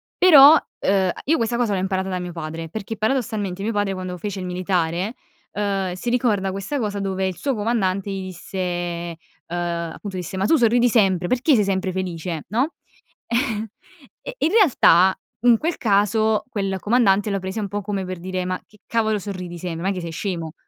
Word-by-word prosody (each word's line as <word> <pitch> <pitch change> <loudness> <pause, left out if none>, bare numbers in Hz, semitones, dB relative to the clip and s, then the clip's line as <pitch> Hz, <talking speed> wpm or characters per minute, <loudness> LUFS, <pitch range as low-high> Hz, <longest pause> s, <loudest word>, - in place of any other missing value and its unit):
però, 305 -4 +9 0.2
uhm, 190 -1 +2
io 320 +4 +2
questa 235 +1 0
cosa 230 -4 +1
l'ho 190 - 0
imparata 190 0 -1
da 185 - -2
mio 180 -1 -6
padre, 165 0 -6
perché 220 +4 -6
paradossalmente 215 -5 -1
mio 225 - 0
padre, 205 -2 0
quando 185 -1 -5
fece 200 +1 -5
il 185 - -5
militare, 180 +2 -1 0.4
ehm, 195 -3 -1
si 235 +6 -3
ricorda 210 -6 +1
questa 195 +9 -3
cosa 205 -4 -2
dove 190 -1 -1
il 190 -1 -2
suo 275 +4 -2
comandante 200 -3 0
gli 190 -1 -4
disse, 185 +1 -8
ehm, 175 -1 -3 0.3
appunto 175 +2 -4
disse: 180 +1 -5
“Ma 195 - 0
tu 325 - +4
sorridi 240 -1 +4
sempre, 190 -6 +2
perché 255 +3 +3
sei 210 - +3
sempre 190 -1 -1
felice, 175 -3 -4
no?” 255 +9 0 1.5
Eh, - - -7
in 315 - +2
realtà, 190 - +5 0.3
in 240 -2 +6
quel 330 +6 -2
caso, 215 0 +2
quel 195 -4 -2
comandante 210 -2 +3
lo 195 - 0
prese 190 +4 -4
un 205 - -2
po' 205 +1 -3
come 200 -1 -3
per 185 -1 -6
dire: 185 +1 -3
“Ma 185 0 -3
che 210 - -22
cavolo 220 -2 +1
sorridi 180 -3 -6
sem 170 -1 -5
non 180 +3 -3
è - - +2
che 180 - -4
sei 170 -1 -5
scemo?” 165 -2 -4
195 Hz, 190 wpm, -22 LUFS, 180-220 Hz, 1.5 s, però